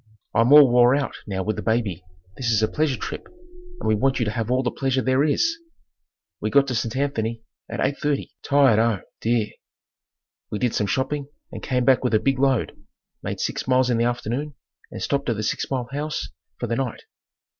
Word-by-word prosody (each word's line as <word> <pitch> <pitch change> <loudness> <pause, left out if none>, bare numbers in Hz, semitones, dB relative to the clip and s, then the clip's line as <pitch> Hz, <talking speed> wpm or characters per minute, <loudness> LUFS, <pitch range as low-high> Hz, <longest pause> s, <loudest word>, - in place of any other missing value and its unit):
I'm 115 +4 +3
all 145 -1 +10
wore 120 +1 +6
out 140 -1 -1
now 95 -2 -2
with 110 +2 -2
the - - -3
baby. 110 -6 -1 0.3
This 120 +1 -2
is 110 -1 +2
a - - +4
pleasure 150 -2 0
trip - - -6 0.5
and - - -4
we 110 - +4
want 130 +5 +1
you 120 - 0
to 105 - -1
have 115 0 -3
all 130 +1 +2
the 125 - 0
pleasure 135 -1 0
there 130 +2 +2
is." 330 - +1 0.8
We - - -2
got 140 -1 +4
to - - -1
St. 115 +1 -2
Anthony 115 -5 -2 0.3
at - - -5
eight 140 +1 0
thirty, 145 -2 -1
tired 140 -6 +4
oh, 115 -4 +1 0.2
dear! 115 -2 +1 1.0
We 105 - -3
did 125 +1 0
some 105 - 0
shopping 140 +3 -1 0.2
and - - -7
came 125 -2 0
back 130 -1 +4
with 125 -3 +2
a - - +4
big 135 +2 0
load; 135 -4 +2 0.5
made - - -4
six - - -3
miles 130 -1 +3
in 115 - +1
the 115 - +2
afternoon 125 +4 -2 0.3
and - - -6
stopped 140 -2 -1
at 115 - +1
the 105 - -3
six - - -2
mile 130 -3 -2
house 150 +2 -3 0.3
for - - -3
the 115 0 -1
night. 125 -2 -3
125 Hz, 210 wpm, -23 LUFS, 115-140 Hz, 1.0 s, all